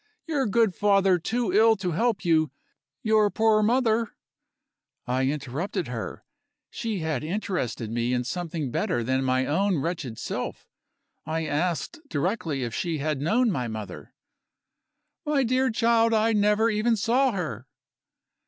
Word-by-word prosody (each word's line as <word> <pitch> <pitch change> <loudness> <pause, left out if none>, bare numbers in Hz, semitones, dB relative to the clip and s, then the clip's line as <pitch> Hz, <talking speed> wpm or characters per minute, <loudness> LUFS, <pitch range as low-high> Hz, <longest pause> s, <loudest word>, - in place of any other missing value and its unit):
Your 290 -6 0
good 220 -1 +2
father 195 -3 +3
too 225 +2 -1
ill 220 +2 +6
to 185 -3 -3
help 210 +3 0
you; 160 -3 +3 0.5
your 215 -1 +4
poor 220 0 +3
mother 230 0 +2 0.5
" - - -61 0.2
I 130 +1 0
interrupted 150 +5 -3
her; 115 -3 -6 0.5
she 225 -6 -3
had 155 -4 -2
interested 155 - -3
me 120 +1 -1
in 125 0 0
something 160 -1 -4
better 120 0 0
than 130 +3 0
my 130 0 +1
own 190 +4 +1
wretched 140 -6 -3
self. - - -5 0.6
I 160 0 -2
asked 170 - -2
directly 155 - -1
if 120 -2 -4
she 165 +3 -2
had 150 -1 -2
known 225 - +2
my 125 -8 -2
mother. 110 -5 -8 1.1
"My 295 -2 +1
dear 255 +2 +2
child, 230 0 +3
I 220 +1 +3
never 210 +1 +3
even 220 +2 +2
saw 245 +6 +2
her!" 145 - -4
180 Hz, 145 wpm, -26 LUFS, 140-225 Hz, 1.1 s, ill